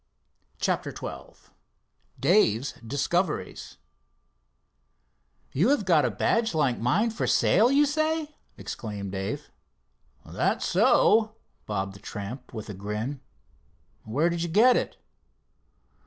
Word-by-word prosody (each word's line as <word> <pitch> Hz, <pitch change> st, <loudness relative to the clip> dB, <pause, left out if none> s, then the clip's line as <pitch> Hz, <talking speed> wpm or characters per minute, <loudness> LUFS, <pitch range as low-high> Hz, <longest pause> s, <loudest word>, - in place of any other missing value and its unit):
CHAPTER -, -, -1 dB
XII -, -, -9 dB, 0.8 s
DAVE'S 140 Hz, -, +3 dB
DISCOVERIES 170 Hz, +8 st, -2 dB, 1.7 s
"You 175 Hz, -, +2 dB
have 280 Hz, -8 st, +2 dB
got 160 Hz, -7 st, +4 dB
a -, -, +1 dB
badge 225 Hz, -, 0 dB
like 140 Hz, -6 st, +1 dB
mine 195 Hz, -, +1 dB
for 220 Hz, -, -2 dB
sale, 230 Hz, +6 st, +4 dB
you 285 Hz, +2 st, +5 dB
say?" 310 Hz, +1 st, -1 dB, 0.2 s
exclaimed 100 Hz, -3 st, -6 dB
Dave. 95 Hz, 0 st, -5 dB, 0.7 s
"That's -, -, -1 dB
so," 220 Hz, 0 st, +3 dB, 0.3 s
bobbed 100 Hz, -2 st, -2 dB
the 100 Hz, -, -13 dB
tramp 105 Hz, +5 st, -7 dB
with 110 Hz, -3 st, -7 dB
a 105 Hz, -, -6 dB
grin. 105 Hz, +8 st, -4 dB, 0.8 s
"Where 145 Hz, +10 st, 0 dB
did 170 Hz, -1 st, -2 dB
you 170 Hz, -, -2 dB
get 235 Hz, +8 st, +5 dB
it?" -, -, -2 dB
150 Hz, 110 wpm, -26 LUFS, -, 1.7 s, you